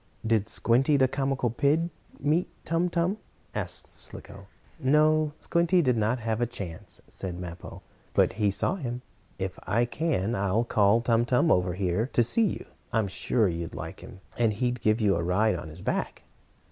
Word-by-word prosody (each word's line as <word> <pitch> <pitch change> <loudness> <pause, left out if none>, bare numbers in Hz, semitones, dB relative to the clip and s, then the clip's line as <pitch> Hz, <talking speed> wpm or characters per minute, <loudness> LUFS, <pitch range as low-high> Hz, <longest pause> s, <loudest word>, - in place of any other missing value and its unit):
"Did 110 -1 +2
Squinty, 130 +6 +3
the 130 -1 +4
comical 135 -3 -1
pig, 155 +7 +1 0.3
meet 155 +5 +1 0.2
Tum 170 +2 +1
Tum?" 175 +5 0 0.3
asked - - -3
Slicko. 100 0 -8 0.3
"No, 150 +2 +3
Squinty 170 +1 +2
did 125 -3 +3
not 110 +3 +1
have 110 0 -1
a 120 - +2
chance," 95 -8 -7
said 90 -2 -6
Mappo, 90 0 -8 0.3
"but - - +4
he 105 - +4
saw 175 - 0
him. 125 -6 -4 0.3
If 95 -1 -4
I 115 +4 +2
can, 120 - -1
I'll 100 +1 +1
call 110 -1 +3
Tum 115 0 +3
Tum 125 +6 +3
over 90 -1 +2
here 95 +4 0
to 120 - +4
see 220 - +2
you. - - -4 0.3
I'm 110 -3 +1
sure 105 +3 +1
you'd 85 -1 -4
like - - -7
him. 95 - -12 0.2
And 115 -2 +3
he'd 125 +2 -1
give 110 +1 +2
you 105 -4 +3
a 85 - 0
ride 95 +6 +2
on 85 -2 -6
his 80 +4 -10
back." - - -2
115 Hz, 175 wpm, -27 LUFS, 100-140 Hz, 0.3 s, the